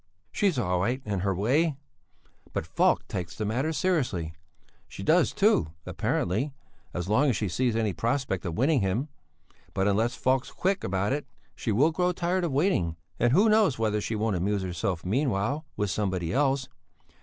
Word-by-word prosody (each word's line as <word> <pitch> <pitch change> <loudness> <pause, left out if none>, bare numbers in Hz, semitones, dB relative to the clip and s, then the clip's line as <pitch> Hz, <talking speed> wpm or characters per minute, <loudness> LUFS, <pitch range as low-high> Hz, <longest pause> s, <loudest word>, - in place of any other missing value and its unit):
"She's 195 -7 +1
all 90 -7 +1
right 120 +8 0
in 100 -3 -1
her 95 +1 0
way, 135 - +1 0.8
but - - -2
Falk - - +2
takes 85 -1 -5
the 110 - -3
matter 130 +9 0
seriously; 130 - 0 0.5
she - - -8
does - - +4
too, 80 0 +2
apparently, 130 +11 -1 0.4
as 90 0 -4
long 125 +8 +3
as 125 - +1
she 105 - -1
sees 120 +6 0
any 110 -3 0
prospect 115 - -1
of 85 -2 -3
winning 135 +2 +3
him; 105 +10 -1 0.7
but 95 +1 +2
unless 110 +5 +1
Falk's 130 0 +1
quick 190 +1 0
about 95 +4 0
it, 145 +1 -3 0.3
she 115 - -3
will 140 +10 +4
grow 180 +2 +1
tired 180 +1 0
of 170 - 0
waiting, 135 - +1 0.2
and 120 0 +3
who 195 - +5
knows 215 - +4
whether 105 -1 0
she 110 - -2
won't 110 -1 0
amuse 100 +2 0
herself 90 0 -2
meanwhile 130 - 0
with 105 -2 0
somebody 95 -4 -1
else? 135 -1 +1
115 Hz, 175 wpm, -27 LUFS, 95-145 Hz, 0.8 s, who